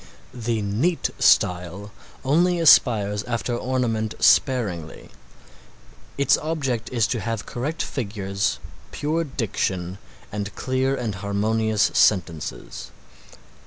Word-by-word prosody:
The 115 -3 -2
neat 125 - 0
style 90 +3 +2 0.3
only 175 +6 +3
aspires 105 -10 +5
after 120 0 -2
ornament 120 -4 -1
sparingly. 100 - +1 1.1
Its 140 -2 +3
object 135 -8 -2
is 115 -4 +2
to 120 - -1
have 115 +1 -3
correct 145 +7 -3
figures, 100 -5 -2 0.3
pure 155 +3 -1
diction 95 - -3 0.3
and 105 0 -5
clear 130 +1 0
and 120 -5 -3
harmonious 105 +2 0
sentences. 85 -7 0
115 Hz, 95 wpm, -23 LUFS, 100-130 Hz, 1.1 s, aspires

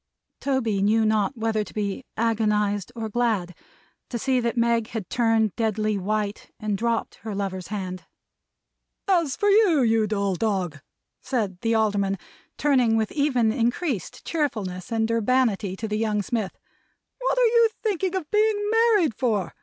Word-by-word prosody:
Toby 235 -8 0
knew 220 +2 +3
not 215 +3 +1
whether 220 -1 0
to - - -13
be 205 +3 -2
agonized 210 -2 +1
or 225 -1 -3
glad, 215 -6 0 0.6
to 240 - -3
see 260 +2 +1
that 235 0 -1
Meg 235 -1 +2
had 225 -5 -6
turned 225 -3 +2
deadly 215 -2 0
white, 205 +1 -2
and 210 -1 -1
dropped 230 +2 -1
her 220 -3 -5
lover's 190 -2 -3
hand. 185 -3 -5 1.0
"As 335 -8 +2
for 410 - 0
you, 400 - +5
you 225 -2 +3
dull 200 -2 0
dog," 185 -6 -1 0.4
said 210 -9 -2
the 225 0 +1
Alderman, 200 -3 +1 0.4
turning 255 -6 +3
with 220 -1 0
even 255 -7 +2
increased 240 - -2
cheerfulness 215 - -2
and 225 -1 +1
urbanity 230 -4 +1
to 220 +3 -4
the 210 0 -2
young 210 -2 0
smith, 215 -3 -3 0.6
"what - - 0
are - - +5
you 465 0 +5
thinking 385 -3 0
of 340 -5 -4
being 430 0 +3
married 445 - +4
for? 215 -5 -1
225 Hz, 155 wpm, -24 LUFS, 205-255 Hz, 1.0 s, you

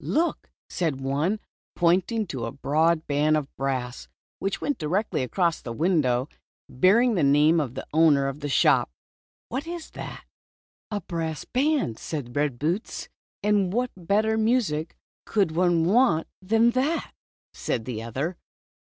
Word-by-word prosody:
" - - -15 0.2
Look," 340 - -1 0.2
said 160 -7 -2
one, 145 +10 0 0.4
pointing 185 +6 +2
to 130 -9 -4
a 115 - -4
broad 155 +4 +1
band 150 +2 +2
of 145 -2 -5
brass, 130 -2 -3 0.3
which 195 0 -2
went 290 - -2
directly 180 +6 -1
across 170 +6 0
the 120 - -6
window, 135 -4 +1 0.4
bearing 215 - +4
the 180 - +1
name 150 +4 +4
of 135 -5 -3
the 135 - -5
owner 150 -4 +4
of 135 +1 -4
the 145 -1 -4
shop, - - +3 0.6
"what 270 +6 -4
is 340 -2 -6
that? - - -8 0.3
" - - -99
"A 210 -2 -3
brass 160 -2 -4
band," 275 - 0
said 135 -7 -5
Red 145 -4 0
Boots. 170 - -3 0.3
"And 205 -3 +2
what 245 +4 0
better 210 +5 +1
music 215 -9 0 0.3
could 200 -7 +1
one 170 0 +2
want 200 -4 +3 0.2
than 225 +5 +3
that?" 275 +7 -1 0.4
said 115 -3 -3
the 115 -4 -4
other. 135 +10 -3
165 Hz, 155 wpm, -25 LUFS, 140-210 Hz, 0.6 s, bearing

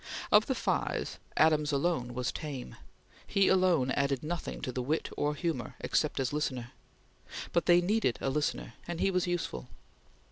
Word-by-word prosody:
Of - - +6
the - - 0
five, - - -1 0.2
Adams 155 -1 +4
alone 140 -5 0
was 125 -1 -1
tame; 140 -5 -6 0.5
he 195 -1 +3
alone 180 -9 +3
added 140 0 0
nothing 170 +2 -4
to 130 - -3
the 125 - -2
wit 150 +6 -1
or 150 0 0
humor, 150 -6 -3
except - - 0
as 130 -2 0
a - - -3
listener; 130 -5 -2 0.8
but 170 - +1
they 175 0 +7
needed 195 - +1
a 135 - -1
listener 150 +2 -1
and 170 -1 -4
he 195 - +2
was 180 -1 +1
useful. 165 - -2
150 Hz, 170 wpm, -31 LUFS, 130-175 Hz, 0.8 s, they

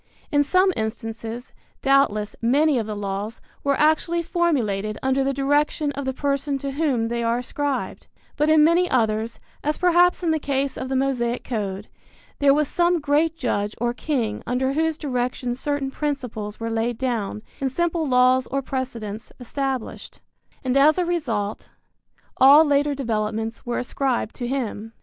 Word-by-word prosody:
In 290 0 +4
some 370 +5 +3
instances, 225 +1 -5 0.3
doubtless, 270 -7 +2
many 280 +4 +3
of 220 - -3
the 215 - -4
laws 205 +2 -4 0.2
were 280 -1 +1
actually 315 +3 +2
formulated 240 - 0
under 265 +1 +2
the 275 - +1
direction 290 +2 +1
of 280 -1 -5
the 265 - 0
person 280 +1 -1
to 275 0 -4
whom 270 -6 0
they 235 0 -2
are 230 0 +1
ascribed; 275 +2 -3 0.3
but 300 +1 +1
in 310 -1 +6
many 340 +3 +4
others, 225 -2 0 0.2
as 300 +1 0
perhaps 355 0 +4
in 335 - +2
the 315 - +1
case 275 -1 -1
of 260 - -5
the 265 - -1
Mosaic 250 -3 0
code, 205 -4 -4 0.5
there 285 -1 +5
was 295 +1 +2
some 345 +2 +2
great 305 +2 +1
judge 210 -6 -1
or 240 +1 0
king 240 -6 -2
under 260 +2 0
whose 320 +1 0
direction 250 -4 -2
certain 275 +1 -2
principles 250 -9 -4
were 230 0 -3
laid 225 +1 -1
down 225 -5 -2 0.2
and 270 -1 -1
simple 335 +1 0
laws 255 0 +4
or 275 0 -2
precedents 235 -5 -5
established, 265 0 -4 0.4
and 255 0 0
as 295 +3 +5
a 360 - +1
result 230 -12 -2 0.7
all 285 +4 +8
later 290 0 +2
developments 225 -2 -3
were 240 - -1
ascribed 250 -3 -1
to 245 - -3
him. 225 -4 -3
265 Hz, 160 wpm, -23 LUFS, 230-290 Hz, 0.7 s, all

